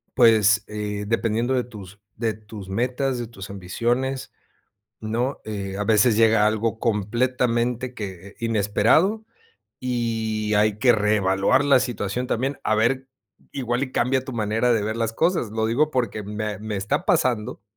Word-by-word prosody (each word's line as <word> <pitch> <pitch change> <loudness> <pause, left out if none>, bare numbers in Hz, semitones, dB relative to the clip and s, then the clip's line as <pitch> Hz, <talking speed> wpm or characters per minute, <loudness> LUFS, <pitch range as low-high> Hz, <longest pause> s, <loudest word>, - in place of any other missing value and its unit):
pues, 110 -2 +5
eh, 105 -1 -4
dependiendo 115 +3 0
de 125 - +1
tus 105 -4 -12 0.2
de 115 -1 -1
tus 105 -3 -11
metas, 125 +5 -1
de 120 - -3
tus 100 -5 -10
ambiciones, 120 +8 -2 0.7
¿no? 120 +5 -2
Eh, 100 -2 -5
a 105 - -1
veces 110 0 +4
llega 110 -2 +5
algo 110 +1 -1
completamente 120 +2 0
que 95 -3 -7
eh, - - -19
inesperado 115 - +2 0.6
y 115 -3 -1
hay 105 0 +2
que 125 0 +5
reevaluar 105 +4 +2
la 140 -2 +5
situación, 120 -1 -2
también, 135 +5 -1
a 110 - +2
ver, 130 +5 +1 0.5
igual 125 0 -1
y 130 - -11
cambia 130 +1 +1
tu 130 - -7
manera 110 +2 +1
de 110 -3 +1
ver 110 +2 -2
las 115 -1 -1
cosas. 165 - 0
Lo 110 0 -1
digo 145 +7 +2
porque 120 -4 -1
me 105 -1 -4
me 110 0 -5
está 140 - -1
pasando 125 - +1
115 Hz, 155 wpm, -23 LUFS, 105-125 Hz, 0.7 s, pues